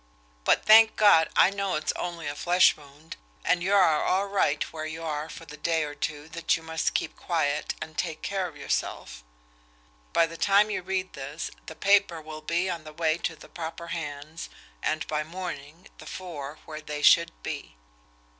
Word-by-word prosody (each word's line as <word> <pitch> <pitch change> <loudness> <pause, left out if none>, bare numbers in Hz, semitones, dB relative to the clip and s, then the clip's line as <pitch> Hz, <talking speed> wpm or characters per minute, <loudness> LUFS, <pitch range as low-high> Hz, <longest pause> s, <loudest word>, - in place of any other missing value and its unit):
But, - - +3
thank 220 +1 +8
God! 200 -6 +6
I 190 - +6
know 200 -1 -1
it's 155 - 0
only 170 -2 -4
a 145 - -2
flesh 175 +4 +4
wound, 145 +2 -13 0.3
and 175 - +2
you 195 +3 +2
are 165 -6 +4
all 190 +2 +2
right 195 -7 +1
where 155 -1 -4
you 160 +1 -6
are 155 -1 -3
for 165 - -9
the 150 -1 -11
day 165 +1 +1
or 145 -1 -5
two 150 0 -4
that 165 +1 0
you 165 - -12
must 160 0 -1
keep - - -1
quiet 155 -4 -1
and 155 0 -7
take 160 -2 -3
care 195 -2 -1
of 155 -4 -12
yourself. - - -3 0.9
By 165 - +4
the 165 0 -9
time 205 +3 +4
you - - -2
read 185 0 -3
this 140 +3 -6 0.2
the 160 - -7
paper 195 -2 +3
will 155 0 -9
be 170 +4 0
on 170 -3 -3
the 155 0 -10
way 160 +1 +1
to 165 - -2
the - - -14
proper 170 0 -7
hands, 155 0 -6 0.3
and 155 0 -1
by 155 0 -1
morning 165 -1 -7
the - - -11
four 155 -5 -7
where 155 -1 -7
they 150 -1 -5
should - - +6
be. - - -6
160 Hz, 190 wpm, -27 LUFS, 150-180 Hz, 0.9 s, thank